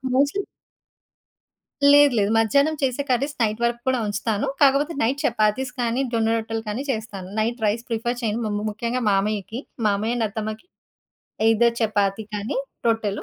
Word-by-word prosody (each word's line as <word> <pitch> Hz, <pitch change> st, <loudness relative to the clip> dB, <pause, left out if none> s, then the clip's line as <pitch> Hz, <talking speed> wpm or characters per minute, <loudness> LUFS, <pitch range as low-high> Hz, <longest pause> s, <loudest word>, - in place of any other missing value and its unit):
Mostly 285 Hz, +9 st, +2 dB, 1.5 s
లేదు 290 Hz, -1 st, +7 dB
లేదు. 200 Hz, +1 st, +1 dB
మధ్యాహ్నం 280 Hz, +8 st, +3 dB
చేసే 260 Hz, +1 st, 0 dB
కర్రీస్ 275 Hz, +4 st, 0 dB
నైట్ 215 Hz, +1 st, -1 dB
వరకు 235 Hz, 0 st, 0 dB
కూడా 260 Hz, -2 st, +2 dB
ఉంచుతాను. 205 Hz, +4 st, -1 dB
కాకపోతే 285 Hz, +4 st, +4 dB
నైట్ 265 Hz, +5 st, 0 dB
చపాతీస్ 245 Hz, 0 st, +1 dB
కానీ 240 Hz, +3 st, 0 dB
జొన్న 225 Hz, 0 st, +2 dB
రొట్టెలు 225 Hz, 0 st, -3 dB
కానీ 225 Hz, +7 st, -3 dB
చేస్తాను. 215 Hz, -5 st, -5 dB
నైట్ 225 Hz, +1 st, -1 dB
రైస్ 220 Hz, +3 st, 0 dB
ప్రిఫర్ 240 Hz, +2 st, -2 dB
చేయను. 225 Hz, 0 st, -1 dB
ము -, -, -1 dB
ము 210 Hz, -, -3 dB
ముఖ్యంగా 235 Hz, +4 st, -3 dB
మామయ్యకి, 210 Hz, +3 st, -1 dB, 0.3 s
మామయ్య 215 Hz, +4 st, 0 dB
అండ్ 225 Hz, -, +1 dB
అత్తమ్మకి. 220 Hz, -, -5 dB, 0.8 s
ఐదర్ 235 Hz, +1 st, +3 dB
చపాతీ 205 Hz, -1 st, +1 dB
కానీ 205 Hz, +4 st, -3 dB, 0.3 s
రొట్టెలు. 225 Hz, -3 st, 0 dB
225 Hz, 150 wpm, -23 LUFS, 215-255 Hz, 1.5 s, లేదు